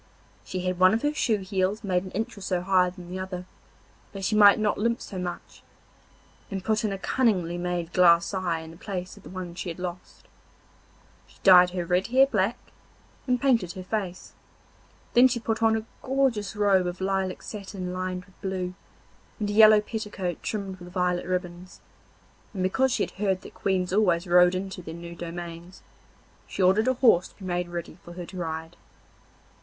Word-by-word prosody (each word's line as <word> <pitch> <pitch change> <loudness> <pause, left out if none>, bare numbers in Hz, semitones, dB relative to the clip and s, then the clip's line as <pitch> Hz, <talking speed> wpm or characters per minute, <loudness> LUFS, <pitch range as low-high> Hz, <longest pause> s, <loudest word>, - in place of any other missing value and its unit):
She 185 - -4
had 185 0 -2
one 185 +3 +6
of 230 - -3
her 295 0 +1
shoe 220 -8 +1
heels 190 +2 -1
made 185 -2 0
an 190 - -8
inch 220 +2 -3
or 200 - -11
so 185 -2 -1
higher 185 -1 +3
than 180 -1 -11
the 185 - -4
other, 185 -1 -5 0.7
that 195 -1 -5
she 215 - +1
might 205 -1 +8
not 215 -2 0
limp 235 +2 +1
so 190 - -7
much, 175 -1 -6 0.9
and 195 -2 -4
put 215 +1 0
in 215 - 0
a 195 - -3
cunningly 190 -6 +1
made 175 -1 -3
glass 170 0 +5
eye 175 -4 -1
in 160 0 -10
the 165 - -14
place 185 -2 -5
of - - -15
the - - -12
one 185 -2 -6
she 175 +1 -5
had 165 - -6
lost. 180 0 -8 1.0
She - - -22
dyed 180 -2 +8
her 180 -1 -3
red 180 +2 +1
hair 260 +3 +5
black, 220 -2 0 0.7
and 250 -1 +2
painted 235 -10 +2
her 185 -2 -7
face. 190 -2 -4 0.8
Then 245 +2 +7
she 245 -1 -2
put 225 -1 -2
on 225 0 +4
a 220 - -5 0.2
gorgeous 260 -6 0
robe 195 -3 +3
of 175 +1 -5
lilac 190 -1 -1
satin 195 -3 -6
lined 185 0 -4
with 190 - -25
blue, 185 -2 -3 0.7
and 205 -1 -1
a - - -3
yellow 215 0 +8
petticoat 210 -5 -4
trimmed 195 -3 -4
with 180 0 -11
violet 180 -1 0
ribbons, 180 0 -4 0.8
and 185 - -1
because 260 +8 +2
she - - +1
had - - -4
heard 190 -3 +1
that - - -12
queens 185 -2 -1
always 185 -4 +2
rode 180 0 +5
into 190 0 -5
their 165 -1 -8
new 170 0 -8
dominions, 170 +1 -8 0.6
she 195 - -2
ordered 195 +5 +4
a 260 - +3
horse 225 -9 +4
to - - -22
be 195 - -11
made 175 -1 -2
ready 175 0 -6
for 175 - -11
her 175 0 -7
to 185 - -10
ride. 160 -1 -5
185 Hz, 195 wpm, -26 LUFS, 180-210 Hz, 1.0 s, might